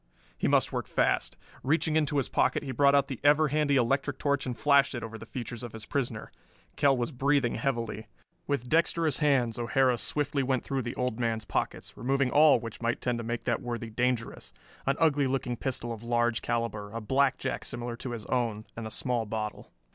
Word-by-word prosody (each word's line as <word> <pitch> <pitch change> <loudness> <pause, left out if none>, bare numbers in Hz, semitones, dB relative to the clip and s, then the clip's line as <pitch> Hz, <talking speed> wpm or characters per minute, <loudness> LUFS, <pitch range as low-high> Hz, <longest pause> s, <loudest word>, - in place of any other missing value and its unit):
He - - -1
must - - +2
work - - -2
fast. - - 0 0.2
Reaching 155 +3 +1
into 150 -1 +1
his 135 - +1
pocket - - +1
he 135 - -4
brought 140 +2 +4
out 140 -1 +3
the 130 - -5
ever 150 +1 +5
handy 150 -1 +2
electric 135 +3 +1
torch 140 -2 0
and 125 -2 -3
flashed 140 -2 +4
it 120 - -4
over 115 0 -6
the 115 0 -9
features 120 -2 -6
of 120 -3 -7
his 110 -1 -8
prisoner. 120 -6 -3 0.4
Kell 140 -2 +3
was 120 +4 -1
breathing 135 -1 +1
heavily. 115 -5 -2 0.4
With 140 -4 -1
dexterous 165 +1 +2
hands 130 -7 +2
O'Hara 125 +1 +2
swiftly 145 +1 -1
went 130 -1 0
through 135 -1 -2
the 120 -1 -5
old 125 -2 -2
man's 115 -2 -1
pockets, 90 - -3
removing 135 +2 0
all 150 0 +6
which 115 -1 -8
might 115 0 0
tend 120 -1 -1
to - - -4
make 120 +1 -3
that 120 -3 0
worthy 120 -2 -4
dangerous 125 0 -2 0.4
an 135 - +3
ugly 145 -4 +3
looking 130 -2 -1
pistol 120 -2 -3
of 110 - -9
large 120 -1 +1
caliber, 115 -3 -2
a 115 - -4
blackjack 135 +5 0
similar 120 -1 -5
to 120 0 -5
his 110 -3 -6
own 115 -4 -1
and 115 -1 -5
a - - -6
small 115 0 -1
bottle. 105 0 -5
125 Hz, 200 wpm, -29 LUFS, 115-140 Hz, 0.4 s, all